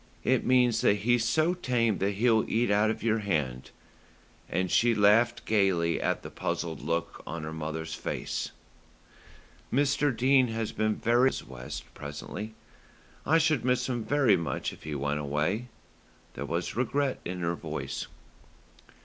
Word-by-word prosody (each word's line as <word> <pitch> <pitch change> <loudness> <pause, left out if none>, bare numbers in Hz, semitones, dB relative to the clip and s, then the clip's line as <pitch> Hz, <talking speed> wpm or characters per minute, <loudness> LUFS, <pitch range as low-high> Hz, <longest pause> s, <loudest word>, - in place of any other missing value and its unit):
It - - +2
means 125 -3 +3
that 100 - +4
he's 120 +1 +3
so 155 +8 +2
tame 120 - 0
that 100 +1 +1
he'll 110 +1 +3
eat 115 -1 +1
out 105 +1 +3
of 110 - -3
your 115 -1 +2
hand;" 75 -11 -2 0.8
and 90 +1 -1
she 120 0 +4
laughed 115 +3 +4
gaily 95 -6 +2
at - - -1
the - - -8
puzzled 80 -2 -3
look 85 +2 -2
on 85 0 -5
her 80 +1 -5
mother's 80 0 -4
face. - - -3 1.2
"Mr. 140 -1 +2
Dene 130 +1 +4
has 115 -1 -3
been 110 0 0
very 120 +3 +3
kind," - - -5
said - - -6
Mrs. - - -17
West 65 +4 -8
presently. 100 +9 -7 0.7
"I 160 +3 +5
should 155 -5 +2
miss 125 0 +1
him 120 -3 -2
very 135 -5 +3
much 80 -6 -3
if - - -14
he 75 -1 -4
went 70 +1 -1
away." 75 +11 -1 0.7
There 70 +3 -5
was 85 +3 -2
regret 130 +3 0
in 90 0 -5
her 85 0 0
voice. - - -5
110 Hz, 160 wpm, -28 LUFS, 85-125 Hz, 1.2 s, I